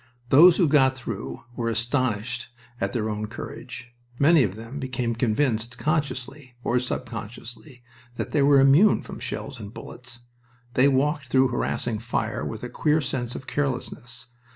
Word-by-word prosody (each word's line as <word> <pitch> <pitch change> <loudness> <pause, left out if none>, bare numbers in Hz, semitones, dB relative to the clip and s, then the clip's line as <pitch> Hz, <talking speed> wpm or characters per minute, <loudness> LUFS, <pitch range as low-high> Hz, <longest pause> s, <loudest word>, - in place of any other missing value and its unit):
Those 165 +6 +8
who 175 - +4
got 135 -3 +4
through 70 - -6
were 115 -1 -1
astonished 120 0 -1 0.3
at 100 0 -1
their 110 -3 -1
own 105 0 -3
courage. 120 +3 -8 0.2
Many 155 +3 +5
of 100 -6 0
them 115 +6 -8
became 125 -3 -2
convinced 115 0 0
consciously 140 -3 -2
or 125 +1 +2
subconsciously 120 +2 -6 0.3
that - - -4
they 145 - +2
were 140 0 +6
immune 140 +10 +5
from - - -8
shells 140 -3 -5
and 100 -2 -8
bullets. 125 +1 -10 0.5
They 130 +2 +5
walked 140 +1 +1
through 130 +1 +3
harassing 120 -2 -2
fire 115 -1 -2
with 110 0 -5
a - - -3
queer 150 +5 +2
sense 125 -4 -3
of 130 - -7
carelessness. 125 -4 -3
125 Hz, 155 wpm, -25 LUFS, 115-140 Hz, 0.5 s, Those